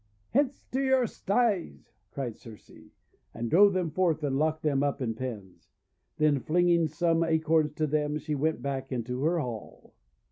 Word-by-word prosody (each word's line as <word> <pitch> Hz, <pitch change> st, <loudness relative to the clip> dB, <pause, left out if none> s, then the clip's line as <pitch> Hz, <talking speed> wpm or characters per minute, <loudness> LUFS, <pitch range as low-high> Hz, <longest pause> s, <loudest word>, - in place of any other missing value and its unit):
:< 100 Hz, -, -41 dB
Hence 280 Hz, 0 st, +1 dB
to 265 Hz, -, 0 dB
your 265 Hz, -2 st, +3 dB
sties!" 205 Hz, -3 st, -1 dB, 0.2 s
cried 125 Hz, -5 st, -5 dB
Circe, 110 Hz, -3 st, -14 dB, 0.6 s
and 115 Hz, 0 st, -4 dB
drove 200 Hz, +3 st, +6 dB
them 180 Hz, -4 st, -1 dB
forth 165 Hz, -3 st, +1 dB
and 140 Hz, -2 st, 0 dB
locked 155 Hz, +2 st, 0 dB
them 140 Hz, -3 st, +1 dB
up 145 Hz, 0 st, 0 dB
in 120 Hz, -4 st, -2 dB
pens. 100 Hz, -9 st, -8 dB, 0.5 s
Then 150 Hz, -2 st, +3 dB
flinging 170 Hz, +2 st, +2 dB
some 165 Hz, +2 st, +1 dB
Acorns 160 Hz, -2 st, +2 dB
to 155 Hz, +1 st, -1 dB
them, 150 Hz, 0 st, 0 dB
she 155 Hz, +1 st, -4 dB
went 155 Hz, +3 st, -1 dB
back 135 Hz, -1 st, -3 dB
into 125 Hz, +1 st, -3 dB
her 170 Hz, +3 st, +2 dB
hall. 120 Hz, -7 st, -7 dB
155 Hz, 170 wpm, -28 LUFS, 135-170 Hz, 0.6 s, drove